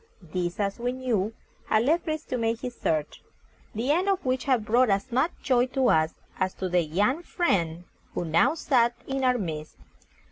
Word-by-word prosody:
This, 175 Hz, 0 st, -2 dB
as 200 Hz, +1 st, -1 dB
we 245 Hz, +1 st, -1 dB
knew, 235 Hz, -6 st, -1 dB, 0.4 s
had 220 Hz, 0 st, +3 dB
led 320 Hz, +7 st, +3 dB
Fritz 310 Hz, -2 st, -3 dB
to 255 Hz, -, -3 dB
make 225 Hz, 0 st, 0 dB
his 250 Hz, -1 st, -4 dB
search, 155 Hz, -8 st, -2 dB, 0.5 s
the 240 Hz, +6 st, 0 dB
end 360 Hz, +6 st, +2 dB
of 390 Hz, -5 st, 0 dB
which 255 Hz, 0 st, 0 dB
had 255 Hz, -6 st, +2 dB
brought 240 Hz, +3 st, +4 dB
as 200 Hz, +4 st, 0 dB
much 260 Hz, +7 st, +2 dB
joy 250 Hz, -2 st, +3 dB
to 260 Hz, -1 st, +1 dB
us 155 Hz, 0 st, +2 dB, 0.2 s
as 185 Hz, -1 st, 0 dB
to 190 Hz, -, -3 dB
the 180 Hz, 0 st, +2 dB
young 205 Hz, -, +1 dB
friend 175 Hz, -, 0 dB, 0.3 s
who 175 Hz, -, -1 dB
now 170 Hz, -, +3 dB
sat 240 Hz, -7 st, +2 dB
in 270 Hz, 0 st, -2 dB
our 250 Hz, -1 st, +3 dB
midst. 155 Hz, -7 st, -5 dB
235 Hz, 190 wpm, -27 LUFS, 185-260 Hz, 0.5 s, brought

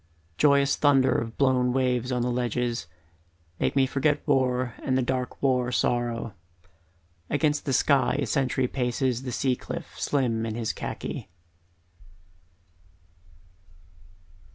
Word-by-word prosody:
Joyous 140 Hz, -1 st, +4 dB
thunder 135 Hz, -3 st, +4 dB
of 115 Hz, 0 st, -2 dB
blown 130 Hz, -2 st, +2 dB
waves 125 Hz, -1 st, 0 dB
on 125 Hz, -1 st, 0 dB
the 125 Hz, -, 0 dB
ledges, 120 Hz, -3 st, -1 dB, 0.7 s
Make -, -, 0 dB
me 135 Hz, -1 st, +4 dB
forget 145 Hz, +4 st, 0 dB
war 130 Hz, -3 st, +1 dB
and 130 Hz, -1 st, 0 dB
the 130 Hz, -, +1 dB
dark 125 Hz, +1 st, -3 dB
war 125 Hz, -2 st, +2 dB
sorrow 120 Hz, -1 st, -1 dB, 1.0 s
Against 150 Hz, 0 st, +1 dB
the 140 Hz, -, -1 dB
sky 140 Hz, 0 st, +3 dB
a 140 Hz, -, 0 dB
sentry 130 Hz, +2 st, 0 dB
paces 125 Hz, -1 st, -1 dB
the 130 Hz, -1 st, -5 dB
sea 130 Hz, +1 st, +1 dB
cliff -, -, -7 dB
Slim 120 Hz, -6 st, 0 dB
in 110 Hz, -, -4 dB
his 115 Hz, -2 st, -2 dB
khaki. -, -, -6 dB
130 Hz, 125 wpm, -26 LUFS, 120-135 Hz, 1.0 s, Joyous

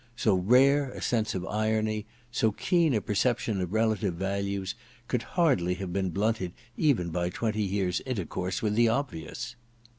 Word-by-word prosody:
So 110 Hz, -3 st, +2 dB
rare 130 Hz, +9 st, +4 dB
a -, -, -7 dB
sense 110 Hz, -4 st, 0 dB
of 90 Hz, -1 st, -3 dB
irony, 110 Hz, 0 st, 0 dB, 0.2 s
so 110 Hz, -2 st, +2 dB
keen 165 Hz, -, +2 dB
a 105 Hz, -, +1 dB
perception 110 Hz, -1 st, 0 dB
of 90 Hz, -1 st, -3 dB
relative 110 Hz, -4 st, +1 dB
values, 100 Hz, +1 st, -2 dB, 0.3 s
could 125 Hz, -, 0 dB, 0.2 s
hardly 105 Hz, -, +3 dB
have 90 Hz, -2 st, -5 dB
been 95 Hz, -1 st, 0 dB
blunted 100 Hz, -1 st, -1 dB, 0.2 s
even 125 Hz, -, +2 dB
by 90 Hz, +1 st, 0 dB
twenty 110 Hz, +3 st, -1 dB
years* 95 Hz, -2 st, 0 dB
intercourse 95 Hz, -, -3 dB
with 105 Hz, -1 st, +1 dB
the 115 Hz, +2 st, +4 dB
obvious. 115 Hz, -, -3 dB
105 Hz, 155 wpm, -28 LUFS, 95-115 Hz, 0.3 s, rare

